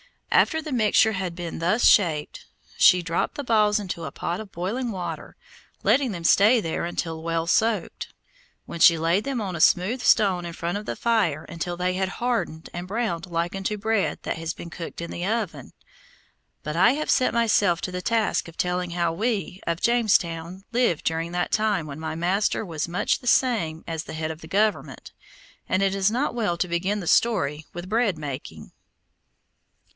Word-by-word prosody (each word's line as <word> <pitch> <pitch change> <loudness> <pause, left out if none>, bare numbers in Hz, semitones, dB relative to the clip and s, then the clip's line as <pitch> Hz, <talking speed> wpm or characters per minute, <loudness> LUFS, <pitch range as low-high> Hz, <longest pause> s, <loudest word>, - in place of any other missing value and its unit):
After 320 - +3
the 305 - -6
mixture 220 -2 +3
had 185 -4 -3
been 170 -2 -6
thus 180 +8 +1
shaped, 160 -7 +3 0.3
she 180 - +6
dropped 165 0 -1
the 285 - -4
balls 215 -3 +3
into 180 -5 -5
a - - -5
pot 175 - -3
of 215 -3 -9
boiling 220 +9 -3
water, 185 -5 -6 0.5
letting 270 -4 +3
them 170 -4 -6
stay 215 +8 +5
there 165 -4 -2
until 165 -2 -4
well 165 0 -1
soaked, 215 +1 0 0.6
when 170 - -7
she 165 0 +7
laid 170 +7 +1
them 275 -3 -2
on 190 -4 -4
a 165 - -3
smooth 205 +12 +3
stone 190 -7 +3
in 170 - -6
front 170 +3 -3
of 210 - -8
the - - -2
fire 200 -11 +1
until 175 +1 -5
they 180 +1 0
had 190 0 0
hardened 235 -10 -2
and 175 +1 -6
browned 195 -5 -2
like 170 0 -2
unto 195 +2 -2
bread 220 -1 0
that - - -3
has 165 0 -4
been 170 - -10
cooked 170 -1 -7
in 170 - -6
the 175 - -5
oven. 200 - -3 0.9
But 150 +1 -4
I 235 +8 +5
have 305 +2 -1
set 255 - +2
myself 210 -6 +2
to 185 - -4
the 180 0 -4
task 225 -2 0
of 165 - -13
telling 180 0 -1
how 170 -1 0
we 200 -2 -2
of 170 0 -1
Jamestown 190 -6 +1
lived 235 -10 +1
during 165 +1 -1
that 175 0 -1
time 210 -6 +1
when 145 0 -8
my 160 0 -4
master 190 +6 0
was 165 -3 -3
much 180 +4 0
the 245 - -11
same 210 -12 +1
as 165 -1 -4
the - - -8
head 155 0 -3
of 160 +1 -10
the 160 - -10
government, 210 +5 -1 0.6
and 190 +1 +2
it 195 -1 +2
is 195 0 +2
not 250 +6 -1
well 210 -8 -1
to 180 - -1
begin 190 +5 -1
the - - -7
story 160 -11 +1
with 175 +1 -7
bread 220 -5 +1
making. 135 - -7
180 Hz, 190 wpm, -24 LUFS, 165-215 Hz, 0.9 s, she